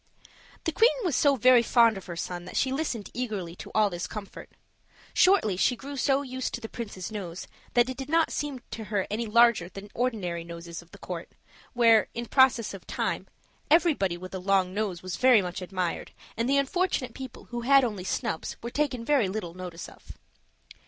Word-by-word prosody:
The 325 - 0
queen 455 +9 +5
was 345 -8 0
so 285 +1 +4
very 250 0 +6
fond 230 -1 +4
of 195 - -9
her 170 - -5
son 175 +1 -5
that 185 - -6
she 265 - +2
listened 265 -7 -3
eagerly 210 -9 -4
to - - -9
all 210 -2 +4
this 175 0 -4
comfort. 210 -3 -8 0.6
Shortly 365 - +4
she 245 - +3
grew 280 +4 -8
so 275 +1 +2
used 260 -1 -3
to - - -7
the 225 - -6
princes's 215 -5 -6
nose 185 -5 -6 0.3
that 240 0 +5
it 260 - -5
did 270 +1 -6
not 330 +1 +3
seem 285 -4 -3
to 220 - -6
her 205 -3 -1
any 225 +2 -2
larger 235 -5 +4
than 200 +2 -10
ordinary 200 -9 -2
noses 170 0 -8
of 170 - -20
the 200 - -14
court; 175 -3 -6 0.4
where, 230 -3 +5
in 235 - -3
process 255 -3 +3
of 195 - -10
time, - - -2 0.4
everybody 295 - +3
with 185 +1 -9
a 190 - -3
long 185 -1 +1
nose 200 -4 -2
was 185 -2 -4
very 250 -3 +6
much 180 -1 -4
admired, 180 -1 -3 0.2
and 230 +3 -1
the 280 - +4
unfortunate 280 -3 0
people 260 -3 -9
who 240 0 -3
had 275 +2 +5
only 210 -6 -2
snubs 165 -3 -3
were 235 - -4
taken 265 -5 -1
very 265 -9 +3
little 185 -4 -4
notice 180 -2 -7
of. - - -13
225 Hz, 200 wpm, -27 LUFS, 185-260 Hz, 0.6 s, very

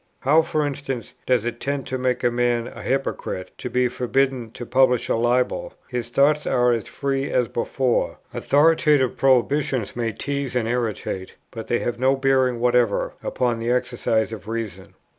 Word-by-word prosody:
How, 155 +4 +5
for 155 -2 -1
instance, 135 -4 -4
does 125 -3 +2
it 120 0 -3
tend 140 0 -2
to 130 - -3
make 125 0 0
a 120 - +3
man 120 -1 0
a - - -9
hypocrite, 125 -8 -2
to - - -4
be 125 0 +2
forbidden 125 0 0
to 120 - -7
publish 125 -1 +2
a - - +2
libel? 125 - 0
his 120 -2 -3
thoughts 145 +4 +2
are 125 0 +3
as 115 -3 -1
free 135 0 -2
as 125 -2 +1
before: 125 +2 -1 0.2
authoritative 150 -3 +3
prohibitions 135 -2 +1
may 115 -2 -1
tease 140 +1 -3
and 120 -2 +1
irritate, 110 -5 -3 0.2
but 115 -1 -7
they 120 - +1
have 120 0 -3
no 130 +1 +3
bearing 130 -2 +2
whatever 120 -3 +2
upon 120 -2 -1
the 115 +1 -2
exercise 120 -3 0
of 105 -1 -9
reason. 110 -5 -5
125 Hz, 170 wpm, -23 LUFS, 120-135 Hz, 0.2 s, How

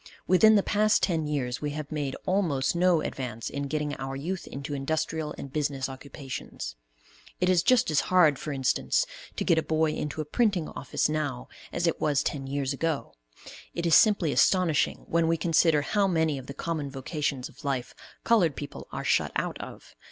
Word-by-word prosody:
Within 215 +4 +6
the 200 - +4
past 215 +1 +2
ten 160 -5 +1
years 135 -3 -2
we 150 - -1
have 150 -1 -6
made 145 -3 -2
almost 175 -8 +1
no 175 -2 +3
advance 120 -6 -4
in 140 0 -3
getting 150 0 -2
our 135 0 -5
youth 175 +7 -4
into 140 +2 -6
industrial 155 +2 -2
and 135 - -8
business 140 -3 -1
occupations. 135 - -7 0.6
It 180 - +2
is 180 -2 +4
just 245 -4 +3
as 150 - +3
hard 165 -7 +5
for 155 - -4
instance, 135 - +1 0.3
to - - -2
get 170 -3 +3
a - - +1
boy 160 0 +1
into 150 0 -4
a 155 - -1
printing 195 - +1
office 135 - -1
now 150 -5 -3 0.2
as 175 - -1
it 165 - 0
was 145 -3 +2
ten 135 -2 -3
years 140 0 -1
ago. 160 +1 -2 0.6
It 170 - -2
is 165 - +2
simply 195 -4 +5
astonishing 180 -4 +2
when 170 0 +1
we 165 0 +2
consider 165 -2 +3
how 200 +5 +2
many 160 -5 +1
of 130 - -11
the 140 - -7
common 155 -2 -3
vocations 135 -1 -3
of - - -16
life 135 -3 -2 0.3
colored 180 - +3
people 145 +1 -7
are - - -4
shut - - +2
out - - -2
of. - - -10
150 Hz, 190 wpm, -27 LUFS, 140-170 Hz, 0.6 s, Within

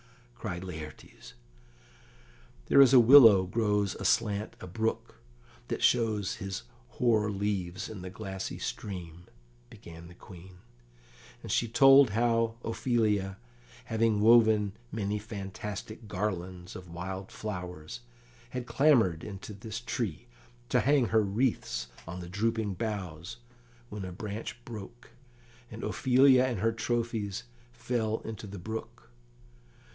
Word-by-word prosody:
cried 95 -7 -5
Laertes. 80 -4 -10 1.3
"There 140 - +6
is 135 -2 +7
a 130 - +9
willow 115 -6 +9
grows 105 0 0
aslant 105 -1 0
a - - -8
brook 110 +5 -3 0.5
that - - -3
shows 110 -4 +2
his 95 -10 -5 0.3
hoar 110 -4 +2
leaves 95 -3 -2
in 105 -4 -8
the 90 - -6
glassy 95 -1 -6
stream," 90 -3 -6 0.4
began 85 0 -12
the 85 - -14
Queen; 90 -1 -13 0.9
and - - -5
she 120 - +1
told 135 +2 +7
how 115 +1 +1
Ophelia, 110 -5 0 0.5
having 115 -1 +1
woven 110 -2 +5 0.2
many 105 -1 -2
fantastic 105 +1 -7
garlands 90 -3 -4
of 90 -1 -10
wild 95 +3 -6
flowers, 90 -2 -6 0.5
had 125 0 -5
clambered 120 - +3
into 100 +1 -8
this 110 +2 -6
tree, 120 -4 -4 0.4
to 125 - +3
hang 130 0 +3
her 110 -1 +4
wreaths 100 - -1 0.2
on 90 +2 -6
the 85 - -8
drooping 110 +1 -1
boughs, 95 -2 -5 0.5
when 105 -1 -6
a 90 - -6
branch 105 +5 -7
broke, 120 +3 -10 0.6
and 110 +1 -9
Ophelia 130 0 +4
and 125 -3 -2
her 115 +1 +2
trophies 115 -3 -2 0.3
fell 120 -2 -2
into 110 -1 -7
the 100 0 -8
brook. 110 +5 -5
105 Hz, 120 wpm, -29 LUFS, 95-115 Hz, 1.3 s, a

